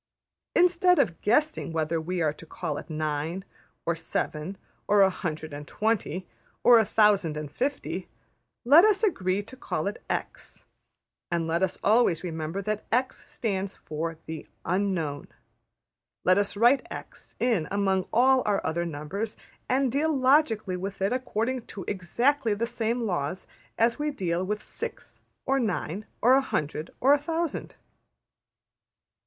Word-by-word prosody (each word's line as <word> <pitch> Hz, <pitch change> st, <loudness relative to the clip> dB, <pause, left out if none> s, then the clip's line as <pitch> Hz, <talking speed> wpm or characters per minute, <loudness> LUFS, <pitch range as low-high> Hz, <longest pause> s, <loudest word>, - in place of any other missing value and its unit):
Instead 360 Hz, 0 st, +5 dB
of 175 Hz, -7 st, +1 dB
guessing 300 Hz, -, +1 dB
whether 160 Hz, 0 st, 0 dB
we 175 Hz, +1 st, -1 dB
are 150 Hz, -2 st, +1 dB
to -, -, -14 dB
call 155 Hz, -2 st, -4 dB
it -, -, -12 dB
nine, 155 Hz, +4 st, -2 dB, 0.4 s
or 170 Hz, -, +2 dB
seven, 165 Hz, +2 st, -3 dB, 0.3 s
or 205 Hz, -1 st, +5 dB
a 190 Hz, -, +4 dB
hundred 160 Hz, -4 st, -5 dB
and 145 Hz, 0 st, -7 dB
twenty, 215 Hz, -4 st, -1 dB, 0.4 s
or 240 Hz, -1 st, +8 dB
a 220 Hz, -, +3 dB
thousand 200 Hz, -8 st, +3 dB
and 150 Hz, -2 st, -5 dB
fifty, 280 Hz, -, -3 dB, 0.6 s
let 295 Hz, +8 st, +8 dB
us 425 Hz, -1 st, +3 dB
agree 195 Hz, -, +1 dB
to 260 Hz, -, -12 dB
call 155 Hz, -11 st, -3 dB
it 205 Hz, +3 st, -4 dB
$x$, -, -, -5 dB, 0.6 s
and 170 Hz, -1 st, 0 dB
let 165 Hz, +2 st, 0 dB
us 190 Hz, -2 st, 0 dB
always 210 Hz, -6 st, +3 dB
remember 165 Hz, +2 st, -3 dB
that 215 Hz, +1 st, -2 dB
$x$ 250 Hz, +3 st, +1 dB
stands 195 Hz, -3 st, -4 dB
for 160 Hz, +1 st, -4 dB
the 160 Hz, -1 st, -7 dB, 0.2 s
Unknown. 175 Hz, -6 st, -1 dB, 1.0 s
Let 185 Hz, +2 st, +5 dB
us 205 Hz, 0 st, -1 dB
write 240 Hz, +5 st, +4 dB
$x$ -, -, -9 dB
in 225 Hz, -11 st, +1 dB
among 195 Hz, -2 st, +1 dB
all 260 Hz, +3 st, +5 dB
our 205 Hz, -1 st, +2 dB
other 170 Hz, +2 st, -1 dB
numbers, 170 Hz, +8 st, -4 dB, 0.3 s
and 260 Hz, -1 st, +2 dB
deal 300 Hz, +5 st, +1 dB
logically 255 Hz, -8 st, +3 dB
with 195 Hz, +2 st, -5 dB
it 200 Hz, -, +2 dB
according 250 Hz, -1 st, -2 dB
to 195 Hz, -, -7 dB
exactly 225 Hz, +5 st, +1 dB
the 225 Hz, +3 st, -1 dB
same 235 Hz, 0 st, -1 dB
laws 175 Hz, -2 st, -2 dB, 0.3 s
as 230 Hz, +4 st, +2 dB
we 300 Hz, 0 st, 0 dB
deal 180 Hz, -, -1 dB
with 210 Hz, +2 st, -3 dB
six, -, -, -7 dB, 0.2 s
or 270 Hz, 0 st, +2 dB
nine, 205 Hz, -, -2 dB, 0.2 s
or 250 Hz, +3 st, +7 dB
a 270 Hz, -, +6 dB
hundred, 155 Hz, -, -3 dB
or 275 Hz, +3 st, +5 dB
a 290 Hz, -, +4 dB
thousand.'' 325 Hz, +1 st, -3 dB
200 Hz, 150 wpm, -27 LUFS, 170-245 Hz, 1.0 s, or